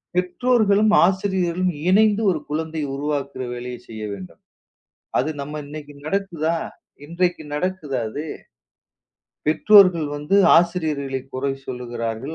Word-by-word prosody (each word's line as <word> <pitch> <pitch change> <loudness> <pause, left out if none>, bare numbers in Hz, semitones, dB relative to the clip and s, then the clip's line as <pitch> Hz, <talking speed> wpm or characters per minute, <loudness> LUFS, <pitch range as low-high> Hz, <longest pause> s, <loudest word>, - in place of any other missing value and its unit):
பெற்றோர்களும், 210 +3 +2
ஆசிரியர்களும், 185 -1 0 0.2
இணைந்து 210 +2 +4
ஒரு 160 - -2
குழந்தைய 160 0 -3
உருவாக்குற 140 -2 -3
வேலையை 125 0 -6
செய்ய 110 -1 -7
வேண்டும். 95 -2 -10 0.8
அது 150 +5 0
நம்ம 150 +2 -5
இன்னைக்கு 145 0 -9
நடக்குதா? 170 -3 -1 0.5
இன்றைக்கு 175 +1 -1
நடக்குதா 150 -5 -2
அது? 145 +8 -5 1.2
பெற்றோர்கள் 180 0 +6
வந்து 150 +7 0 0.2
ஆசிரியர்களை 155 -6 -1
குறை 135 +1 -1
சொல்கிறார்கள், 120 +2 -4
155 Hz, 100 wpm, -22 LUFS, 140-185 Hz, 1.2 s, பெற்றோர்கள்